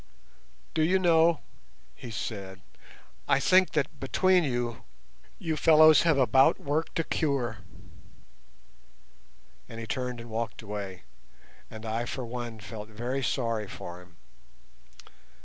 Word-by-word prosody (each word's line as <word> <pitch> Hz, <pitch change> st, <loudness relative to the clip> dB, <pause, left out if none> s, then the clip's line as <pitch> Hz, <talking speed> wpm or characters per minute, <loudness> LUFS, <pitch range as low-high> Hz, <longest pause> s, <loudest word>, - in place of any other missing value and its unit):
"Do 160 Hz, -, 0 dB
you 175 Hz, +4 st, +3 dB
know," 170 Hz, -3 st, +4 dB, 0.5 s
he 120 Hz, -, -10 dB
said, 100 Hz, -3 st, -6 dB, 0.7 s
"I 140 Hz, -1 st, +3 dB
think 185 Hz, +6 st, +4 dB
that 150 Hz, -1 st, -1 dB
between 185 Hz, +6 st, +3 dB
you, 120 Hz, -4 st, -2 dB, 0.6 s
you 160 Hz, -2 st, -2 dB
fellows 155 Hz, 0 st, +7 dB
have 165 Hz, -4 st, +3 dB
about 135 Hz, 0 st, +4 dB
worked 150 Hz, +5 st, -2 dB
a -, -, +2 dB
cure," 135 Hz, -10 st, -1 dB, 2.1 s
and 115 Hz, -, -8 dB
he 115 Hz, -, -5 dB
turned 125 Hz, +1 st, -3 dB
and 115 Hz, 0 st, -10 dB
walked 110 Hz, -1 st, -4 dB
away, 100 Hz, -3 st, -6 dB, 0.7 s
and 110 Hz, 0 st, -10 dB
I 115 Hz, +2 st, -2 dB
for 125 Hz, +1 st, -5 dB
one 120 Hz, -1 st, -6 dB
felt 105 Hz, 0 st, -8 dB
very 120 Hz, +5 st, -3 dB
sorry 115 Hz, -4 st, -1 dB
for 90 Hz, -1 st, -9 dB
him. 90 Hz, -1 st, -19 dB
120 Hz, 125 wpm, -28 LUFS, 110-155 Hz, 2.1 s, fellows